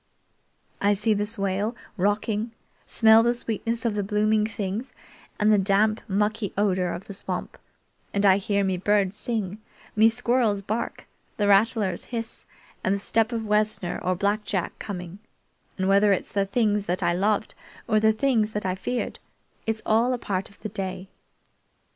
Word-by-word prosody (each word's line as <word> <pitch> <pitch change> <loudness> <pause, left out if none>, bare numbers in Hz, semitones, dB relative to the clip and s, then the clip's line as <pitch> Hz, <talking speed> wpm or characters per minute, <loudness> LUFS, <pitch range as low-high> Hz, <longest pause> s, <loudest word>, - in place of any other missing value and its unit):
I 205 +1 +4
see 210 +2 +2
the 205 0 -1
swale 205 +1 -1 0.2
rocking, 210 +3 0 0.3
smell 220 -1 +7
the 240 +1 +2
sweetness 230 0 -3
of 230 - +1
the 205 - -1
blooming 210 +1 +1
things, 210 +3 -4 0.5
and 215 +1 +4
the 210 - +4
damp, 205 +3 +2
mucky 210 +1 0
odor 185 -3 +1
of 175 +3 -6
the 200 - -8
swamp; 190 - -4 0.6
and 200 0 +1
I 190 -1 +6
hear 200 0 0
me 190 -1 0
birds 200 0 +1
sing, 215 -4 -3 0.4
me 220 +1 +6
squirrels 230 -3 +1
bark, 220 +4 -3 0.3
the 205 - +1
rattlers 205 -1 +2
hiss, 230 -2 -5 0.4
and 190 - +2
the - - -3
step 225 +3 +1
of 225 -2 -3
Wessner 210 -3 0
or 185 0 0
Black 205 +3 0
Jack 190 -4 -2
coming; 180 -2 -6 0.6
and 190 -1 0
whether 200 +1 +5
it's 195 - -1
the 200 -1 0
things 210 -1 +1
that 180 +1 -1
I 170 - +2
loved 205 +4 0 0.3
or 215 -2 +3
the 220 0 +4
things 220 -2 +1
that 210 - -3
I 185 - +1
feared, 240 +6 -3 0.5
it's 225 -1 -1
all 230 +4 +3
a - - -1
part 195 -4 -3
of 200 - -21
the 215 - -4
day. 190 -1 -5
210 Hz, 170 wpm, -25 LUFS, 195-220 Hz, 0.6 s, smell